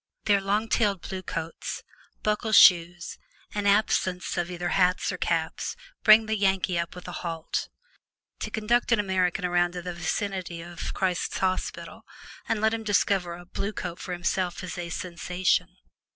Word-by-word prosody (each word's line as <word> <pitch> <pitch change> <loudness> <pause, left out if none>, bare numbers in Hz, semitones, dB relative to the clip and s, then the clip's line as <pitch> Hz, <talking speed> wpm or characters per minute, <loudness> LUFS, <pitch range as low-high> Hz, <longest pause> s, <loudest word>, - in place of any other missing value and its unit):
Their 200 -2 +4
long 205 +3 0
tailed 205 -5 +1
blue 190 -1 -4
coats, 165 -2 -5 0.4
buckle 215 +1 0
shoes, 175 -2 +5 0.3
and 205 -1 -1
absence 195 -3 +2
of 175 -1 -1
either 175 -1 -3
hats 180 -1 +2
or - - -4
caps - - -1 0.3
bring 215 +1 +8
the 220 0 0
Yankee 190 -3 +1
up 170 +1 -3
with 180 - -10
a - - -5
halt. 165 -2 -3 0.7
To - - -3
conduct 235 +3 +1
an 230 - +4
American 190 -2 +1
around 175 0 +2
to 180 -1 -6
the 180 0 -4
vicinity 185 -1 -3
of 175 0 -6
Christ's 185 -2 -1
Hospital 185 -1 -2 0.5
and 225 - +1
let 220 0 +3
him 225 - -2
discover 195 -4 +1
a 175 +1 -12
"Blue 200 +3 -4
Coat" 175 -3 -5
for 180 - -5
himself 180 +1 -1
is 180 -3 -5
a 175 -1 -5
sensation. 180 +1 -1
185 Hz, 165 wpm, -27 LUFS, 175-205 Hz, 0.7 s, bring